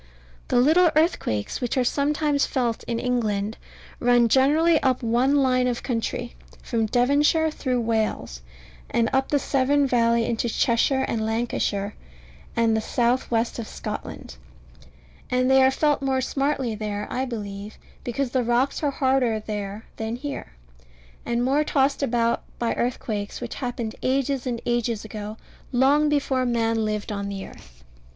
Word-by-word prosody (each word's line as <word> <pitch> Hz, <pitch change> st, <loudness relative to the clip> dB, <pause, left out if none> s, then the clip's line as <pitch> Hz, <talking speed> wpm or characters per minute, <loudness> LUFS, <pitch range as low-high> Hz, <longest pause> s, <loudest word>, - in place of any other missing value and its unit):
The -, -, +3 dB
little 325 Hz, +7 st, +5 dB
earthquakes 305 Hz, -, 0 dB
which 245 Hz, +2 st, -1 dB
are 255 Hz, -, +3 dB
sometimes 290 Hz, +2 st, +1 dB
felt 240 Hz, -4 st, -1 dB
in 235 Hz, -, -2 dB
England 220 Hz, -4 st, -1 dB, 0.4 s
run 240 Hz, -1 st, +4 dB
generally 300 Hz, +6 st, +4 dB
up 260 Hz, -1 st, +1 dB
one 245 Hz, +5 st, +2 dB
line 255 Hz, -2 st, +3 dB
of 245 Hz, -1 st, -2 dB
country, 240 Hz, 0 st, -3 dB, 0.3 s
from 225 Hz, -2 st, 0 dB
Devonshire 290 Hz, +7 st, +3 dB
through 255 Hz, -5 st, -1 dB
Wales, 220 Hz, -, -1 dB, 0.5 s
and 230 Hz, -1 st, +1 dB
up 265 Hz, 0 st, +1 dB
the 290 Hz, -, +3 dB
Severn 280 Hz, +1 st, +2 dB
valley 235 Hz, -2 st, +2 dB
into 230 Hz, +1 st, -1 dB
Cheshire 250 Hz, +4 st, +2 dB
and 220 Hz, -1 st, -1 dB
Lancashire, 220 Hz, -3 st, -1 dB, 0.6 s
and 230 Hz, -1 st, +3 dB
the 220 Hz, -, +1 dB
south 240 Hz, +3 st, 0 dB
west 230 Hz, 0 st, 0 dB
of 225 Hz, -, -5 dB
Scotland; -, -, -7 dB, 0.9 s
and 255 Hz, +1 st, +2 dB
they 265 Hz, 0 st, +6 dB
are 260 Hz, -, +6 dB
felt 295 Hz, +1 st, +1 dB
more 265 Hz, -1 st, +1 dB
smartly 275 Hz, -2 st, -1 dB
there, 210 Hz, -1 st, -4 dB
I 260 Hz, -, -1 dB
believe, 205 Hz, -4 st, -6 dB, 0.3 s
because 255 Hz, +1 st, -2 dB
the 255 Hz, -, +1 dB
rocks 240 Hz, +4 st, +1 dB
are 295 Hz, -, +1 dB
harder 260 Hz, -5 st, +1 dB
there 210 Hz, 0 st, -5 dB
than 220 Hz, +1 st, -3 dB
here, 280 Hz, -, -6 dB, 0.7 s
and 240 Hz, +1 st, 0 dB
more 280 Hz, +3 st, +2 dB
tossed 275 Hz, -1 st, +1 dB
about 235 Hz, -3 st, +1 dB, 0.2 s
by 235 Hz, -, 0 dB
earthquakes 215 Hz, -4 st, -3 dB
which 240 Hz, -1 st, -5 dB
happened 240 Hz, -3 st, -4 dB
ages 270 Hz, 0 st, 0 dB
and 235 Hz, -2 st, -3 dB
ages 240 Hz, -2 st, -1 dB
ago, 215 Hz, 0 st, -7 dB, 0.3 s
long 280 Hz, +4 st, +4 dB
before 275 Hz, -3 st, +1 dB
man 230 Hz, -2 st, +1 dB
lived 215 Hz, 0 st, -3 dB
on 200 Hz, -1 st, -3 dB
the 195 Hz, -1 st, -5 dB
earth. -, -, -16 dB
245 Hz, 150 wpm, -24 LUFS, 225-270 Hz, 0.9 s, they